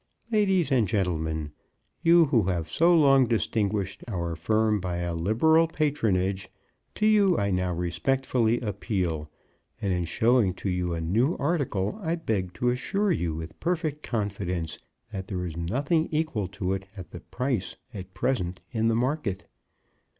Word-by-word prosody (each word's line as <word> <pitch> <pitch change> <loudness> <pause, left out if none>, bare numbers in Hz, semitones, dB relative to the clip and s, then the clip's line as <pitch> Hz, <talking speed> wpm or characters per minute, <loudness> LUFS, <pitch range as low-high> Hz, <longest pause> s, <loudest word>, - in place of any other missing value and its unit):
Ladies 195 -7 +2
and 120 -6 +3
gentlemen, 80 -6 -1 0.5
you 170 0 +6
who 120 - +2
have 85 -4 -2
so 170 +2 +4
long 135 -5 +5
distinguished 105 -4 -1
our 85 -6 -3
firm 110 +5 +1
by 90 -2 -3
a 85 -1 -2
liberal 120 - +3
patronage, 100 - 0 0.5
to 215 - 0
you 205 -4 +4
I 100 0 0
now 90 -1 0
respectfully 120 +6 0
appeal, 95 -8 -2 0.5
and 100 -2 0
in 90 -1 -1
showing 110 +1 +2
to 95 - -3
you 90 -1 -1
a 85 - -3
new 115 - +1
article 140 - -1
I 165 -2 0
beg 100 - -2
to 125 - +1
assure 195 +11 0
you 85 - -1
with 80 0 -8
perfect 160 -4 -1
confidence 95 - -3 0.3
that 95 -3 -5
there 90 -2 -3
is 85 -3 -5
nothing 140 - 0
equal 155 - -1
to 95 -1 -2
it 95 0 -5
at 90 -3 -8
the - - -8
price 125 -7 -3 0.2
at 95 -2 -9
present 95 -5 -1
in 115 -2 +1
the 115 - +2
market. 120 -5 -1
105 Hz, 155 wpm, -27 LUFS, 90-135 Hz, 0.5 s, you